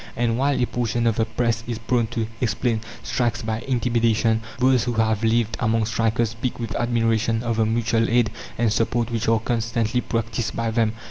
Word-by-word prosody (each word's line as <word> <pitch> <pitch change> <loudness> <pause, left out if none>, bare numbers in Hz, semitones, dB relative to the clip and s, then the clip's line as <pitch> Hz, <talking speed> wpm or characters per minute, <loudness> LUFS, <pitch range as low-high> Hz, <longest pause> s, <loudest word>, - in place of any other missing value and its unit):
And 115 -1 +1
while 140 +1 +2
a 125 - +3
portion 120 -1 -1
of 115 -2 +2
the 115 - +2
Press 115 0 -1
is 120 -2 -3
prone 115 +1 0
to 115 -1 -2 0.2
explain 115 0 0 0.2
strikes 120 -3 -1
by 110 0 -2
"intimidation," 115 -3 +2 0.2
those 130 -1 +3
who 120 - -1
have 110 -1 +1
lived 115 0 +2
among 115 -1 +1
strikers 115 0 0
speak 115 +2 -4
with 115 -5 -4
admiration 115 -1 +1
of 115 -2 -1
the 110 -1 +2
mutual 115 0 +1
aid 115 -2 +3 0.3
and 115 -2 +2
support 115 +1 0
which 115 0 -2
are 115 0 +4
constantly 115 +1 -1
practised 115 -2 -2
by 115 -1 -1
them. 110 -1 +1
115 Hz, 190 wpm, -23 LUFS, 110-120 Hz, 0.3 s, are